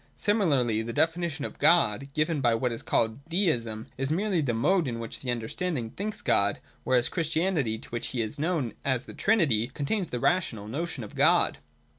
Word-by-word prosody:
Similarly 140 - +2
the 115 +1 -5
definition 160 -1 0
of - - -8
God, 140 -7 +4
given 155 -1 +1
by 120 -3 +3
what 125 +2 0
is 115 - -4
called 115 +4 0
Deism, 120 - 0
is 135 +2 0
merely 190 0 +1
the 135 -5 0
mode 165 +7 +2
in 120 -2 -3
which 115 -1 -5
the 130 - -5
understanding 120 +2 -2
thinks 205 +1 -5
God: 100 0 +2 0.2
whereas 125 -1 +2
Christianity, 160 -7 0
to - - -12
which 120 -1 -3
He 130 - -4
is 110 +7 -3
known 155 -7 -1
as 130 -2 0
the - - -10
Trinity, 155 - +2
contains 150 - -2
the 125 - -3
rational 120 - 0
notion 145 +2 -4
of 105 - -10
God. - - +3
140 Hz, 185 wpm, -27 LUFS, 115-170 Hz, 0.2 s, God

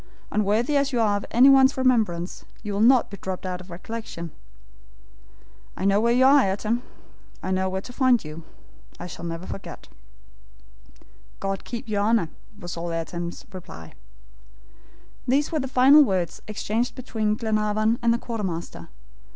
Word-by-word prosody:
Unworthy 215 +7 +1
as 280 0 +1
you 245 - 0
are 210 -3 +3
of 205 - -7
anyone's 265 +2 +6
remembrance, 220 -10 +1 0.2
you 210 -2 -4
will 200 - 0
not 245 0 +5
be 200 - -7
dropped 190 0 -5
out 180 -1 -4
of 185 - -14
recollection. 175 -2 -7 1.5
I - - -2
know 200 +1 +3
where 235 +1 +3
you 255 +2 +4
are, 280 +2 +7
Ayrton; 215 +5 -1 0.6
I 185 - -2
know 190 0 +1
where 190 0 -3
to 245 - -11
find 250 - +3
you 155 +2 -8 0.6
I - - -6
shall 175 -1 -8
never 165 +1 -5
forget." 195 - -8 1.5
"God 195 0 -3
keep 235 -1 -6
your 205 -2 0
Honor," 215 -5 +2 0.3
was 175 -3 -7
all 170 0 -4
Ayrton's 170 +1 -5
reply. 80 - -10 1.3
These 275 +4 +2
were 315 - 0
the 270 - -2
final 265 +4 +7
words 185 - -1
exchanged 215 +3 -2
between 220 -5 -1
Glenarvan 215 0 0
and 235 -1 +3
the 235 - +2
quartermaster. 200 -9 -5
215 Hz, 155 wpm, -24 LUFS, 185-240 Hz, 1.5 s, are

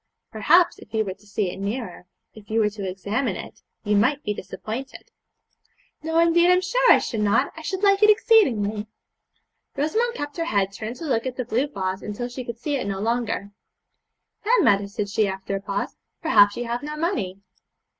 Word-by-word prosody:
'Perhaps, 335 - +3
if - - -15
you 220 0 +1
were 190 - -4
to 210 - -23
see 200 -2 -1
it - - -9
nearer, 200 -3 -5 0.3
if 215 -2 -15
you 220 +1 +1
were 210 -1 +2
to 200 -2 -5
examine 200 +8 -2
it, - - -9 0.2
you 210 -1 +1
might 260 +8 +2
be 210 - -1
disappointed.' 215 +7 -7 0.9
'No, 320 +1 -1
indeed, 340 +1 +5
I'm 360 0 +5
sure - - +3
I - - +8
should 225 - -3
not; 210 +6 +2
I 320 - -9
should 380 +5 -4
like 395 0 +4
it 425 - +7
exceedingly.' 235 - +3 0.9
Rosamond 450 +12 0
kept 290 -3 -5
her 335 - -1
head 200 -8 0
turned 215 +5 -6
to 330 - -8
look 255 -4 0
at 255 - -4
the 255 - -3
blue 245 +6 0
vase 190 -7 -3 0.2
till 245 0 -3
she 250 +1 -6
could 235 -1 -6
see 285 +4 -2
it 250 - -4
no 195 -1 -2
longer. 225 -2 -1 0.9
'Then, 455 -1 +3
mother,' 200 -3 +3
said 205 0 -4
she, 205 +1 +1
after 190 +1 -4
a 195 - -3
pause, 200 0 -3 0.2
'perhaps 205 - +4
you 240 - -3
have 235 +1 -3
no 300 +1 -6
money.' 230 - -2
230 Hz, 200 wpm, -24 LUFS, 205-310 Hz, 0.9 s, I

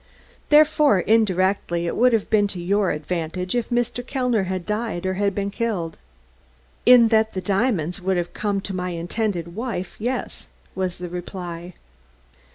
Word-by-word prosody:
"Therefore, 300 - +5
indirectly, 185 -4 +1
it 170 - -2
would 250 +2 +4
have 225 -3 +1
been 205 -2 +4
to 190 -3 -6
your 195 +2 +1
advantage 170 +3 -3
if 240 -2 -1
Mr. 245 0 -1
Kellner 250 -6 0
had 185 -1 -3
died 210 -4 -2
or 185 - 0
had 200 0 0
been 200 0 -2
killed?" 195 -8 -2 0.9
"In 245 -2 +8
that 220 -1 +2
the 190 - -2
diamonds 195 - 0
would 190 0 0
have 175 0 -3
come 205 -2 -1
to 195 - -5
my 180 0 -2
intended 175 0 -3
wife, 220 -3 -4
yes," 245 +3 -3 0.3
was 185 -2 -2
the 180 - -6
reply. 175 -1 -7
195 Hz, 160 wpm, -23 LUFS, 180-225 Hz, 0.9 s, In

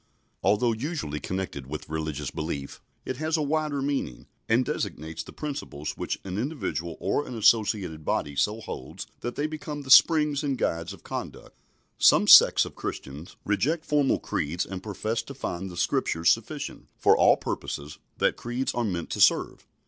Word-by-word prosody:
Although 105 +4 +3
usually 115 - -4
connected 90 -9 -4
with 75 +2 -6
religious 75 -2 -3
belief, 75 -3 -5 0.2
it 130 - -4
has 155 +2 0
a 155 - 0
wider 150 -1 -1
meaning, 140 - -3 0.2
and 120 +3 +3
designates 80 -6 -4
the - - -10
principles 135 - -5
which - - -3
an 95 +1 -4
individual 115 - -3
or 100 +10 -1
an 125 - -6
associated 105 -7 +2
body 75 -1 -1
so 105 +10 0
holds - - -7
that 120 +1 -5
they 145 - -1
become 150 -1 -5
the 130 - -5
springs 150 -1 +6
and 140 -3 -1
guides 85 -4 -1
of 100 -4 -12
conduct. - - -7 0.4
Some - - +6
sects - - +9
of - - -9
Christians 70 +6 -7
reject 145 - 0
formal 145 -2 +2
creeds 85 +5 -2
and 95 -1 -6
profess 110 +2 -2
to 140 - -10
find 95 -7 -4
the 90 - -9
Scriptures 80 -1 +2
sufficient - - -3
for - - +5
all - - +5
purposes 75 +1 -5 0.2
that - - +1
creeds 120 +2 -2
are 120 - -1
meant 90 -6 -3
to - - -2
serve. - - +3
110 Hz, 170 wpm, -27 LUFS, -, 0.4 s, sects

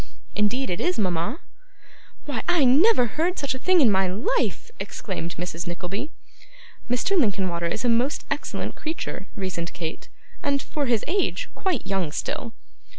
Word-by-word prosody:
'Indeed 210 +3 +1
it 175 - -1
is, 360 +1 +1
mama.' 185 - 0 0.8
'Why, 275 -7 -2
I 325 -6 +5
never 285 - +6
heard 330 +10 0
such 280 -2 0
a 260 - -5
thing 370 +3 +5
in 240 -6 +6
my 190 -1 +3
life!' 465 - 0
exclaimed 180 -6 -4
Mrs. 175 +1 -4
Nickleby. 180 - -3 0.8
'Mr. 250 +11 +2
Linkinwater 190 - +2
is 205 +7 -2
a - - +4
most 245 +6 +2
excellent - - -2
creature,' 310 - -4
reasoned 185 -3 -3
Kate, 165 -2 -5 0.3
'and, 280 -1 +1
for 285 0 -2
his 235 -3 +2
age, 405 +6 0
quite 365 - -1
young 190 -5 0
still. 225 +8 -3
230 Hz, 150 wpm, -25 LUFS, 185-300 Hz, 0.8 s, never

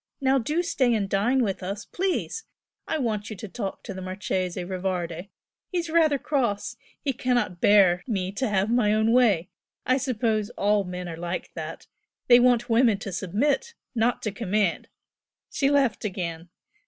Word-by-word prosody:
Now 270 0 +3
do 300 +8 0
stay 255 -9 +2
and 205 -3 0
dine 235 +7 +2
with 195 -3 -2
us, 195 +3 -5
please! 385 +4 -2 0.4
I 320 - 0
want 215 -6 -2
you 215 - -6
to 215 - -8
talk 195 -1 -5
to - - -6
the 185 - -7
Marchese 185 -1 -3
Rivardi 180 -1 -3 0.4
he's 345 -4 -2
rather 315 -3 +4
cross! 245 -8 -1 0.3
He 275 - 0
cannot 240 -8 -1
bear 190 -4 +5
me 190 -5 -1
to 220 +4 -2
have 200 +1 +1
my 225 -4 +3
own 220 +1 +2
way! 215 -9 +3 0.4
I 255 +1 +3
suppose 225 -5 0
all 205 0 +2
men 180 0 -5
are 165 -1 -6
like 175 +1 -4
that! - - -7 0.4
they 240 0 +9
want 245 -1 +3
women 230 -3 +4
to 195 - -6
submit, 265 - -1 0.2
not 235 0 +1
to 215 - -1
command!" 205 -4 0 0.6
She 275 - +1
laughed 280 -5 +2
again. 175 -4 -4
215 Hz, 165 wpm, -26 LUFS, 190-255 Hz, 0.6 s, they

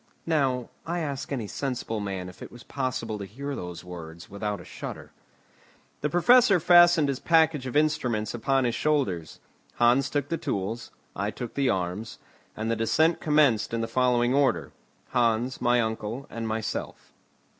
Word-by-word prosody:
Now 135 -6 0
I 170 +2 -3
ask 145 -5 -4
any 125 -6 -2
sensible 120 -1 -3
man 95 -3 -4
if 90 - -12
it - - -8
was 120 - -12
possible 115 -5 -3
to 100 - -5
hear 140 +8 -6
those 90 -4 -7
words 85 -2 -10
without 100 0 -3
a - - -11
shudder. - - -8 0.9
The 150 - -1
Professor 205 - +5
fastened 175 -2 +6
his 135 -1 -2
package 160 -5 +3
of 125 - -6
instruments 130 -8 +1
upon 135 +3 +1
his 120 -1 +1
shoulders; 115 - -1 0.4
Hans 120 +3 +3
took 145 -1 -2
the 165 - -1
tools; 105 +5 -3 0.3
I 100 +2 -1
took 115 +2 -6
the 140 -2 +1
arms: 95 +4 -2 0.4
and 110 +1 -1
the - - +1
descent 155 +9 +2
commenced 145 -8 +3
in 115 - -1
the 115 - -2
following 125 0 +2
order; 120 - +2 0.4
Hans, 120 0 +1
my 120 0 +3
uncle, 110 +3 -3
and 115 -1 -4
myself. 110 0 -4
120 Hz, 165 wpm, -27 LUFS, 110-145 Hz, 0.9 s, fastened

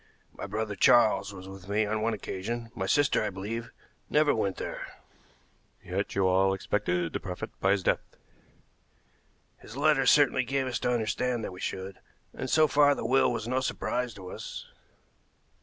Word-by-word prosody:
My - - -7
brother 105 +1 -3
Charles 105 -1 +4
was 95 -1 -10
with 95 0 -11
me 105 +1 +2
on 110 +1 -1
one 115 +1 0
occasion; 115 +4 -5
my 95 -1 -3
sister, 145 +6 +3
I 105 - 0
believe, 110 +5 -5 0.4
never 150 -1 +4
went 100 -4 -1
there." - - -5 1.0
"Yet - - -3
you 100 -1 +2
all 95 +1 +3
expected 90 -4 -1
to - - -1
profit 90 -2 -6
by 95 +1 +3
his 100 -2 -1
death?" - - +2 1.6
"His 115 - -11
letters 145 -3 +4
certainly 140 -3 +4
gave 135 +2 -1
us 125 -4 -2
to 125 - 0
understand 120 +1 -1
that 95 - -5
we 90 - -10
should, 95 0 -5 0.3
and 130 - -5
so 155 +5 +5
far 145 0 +4
the - - -5
will 130 +3 +3
was 115 -2 -3
no 130 +2 +1
surprise 125 -2 -2
to 95 -2 -9
us." - - -7
110 Hz, 175 wpm, -28 LUFS, 95-125 Hz, 1.6 s, so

